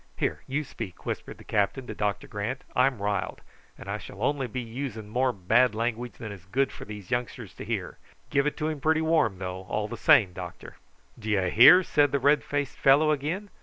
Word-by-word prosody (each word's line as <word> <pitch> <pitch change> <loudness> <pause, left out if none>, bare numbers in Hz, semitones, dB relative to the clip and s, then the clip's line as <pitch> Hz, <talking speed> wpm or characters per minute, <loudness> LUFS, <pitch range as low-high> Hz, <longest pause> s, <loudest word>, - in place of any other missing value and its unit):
"Here, - - -1
you 145 +3 -1
speak," 115 -9 -8
whispered - - -5
the - - -14
captain 105 +5 0
to - - -6
Doctor 105 -1 -2
Grant. 105 +6 -4
"I'm 125 -4 +2
riled, 100 -1 -2 0.4
and - - -11
I - - -3
shall - - -10
be 100 - -11
only 130 -3 -1
using 115 -2 -5
more 125 +3 +1
bad 110 +4 +2
language 120 +1 -2
than 110 -2 -8
is 95 -3 -11
good 135 +7 +1
for - - -10
these 105 -3 -9
youngsters 120 0 -3
to - - -9
hear. - - -4 0.3
Give 140 0 +2
it 150 - -2
to 155 - -1
him 155 -3 -4
pretty 160 +2 +2
warm, 155 - +2
though, 90 0 -5
all 105 0 -1
the 115 - -7
same, 95 -4 +5
doctor." - - -9 0.4
"D'yer 105 -5 0
hear?" 180 - +8
said 145 -5 +2
the 140 - +2
red 145 +3 +3
faced 145 -2 -3
fellow 145 +3 +5
again. 160 +8 -2
125 Hz, 205 wpm, -27 LUFS, 105-145 Hz, 0.4 s, hear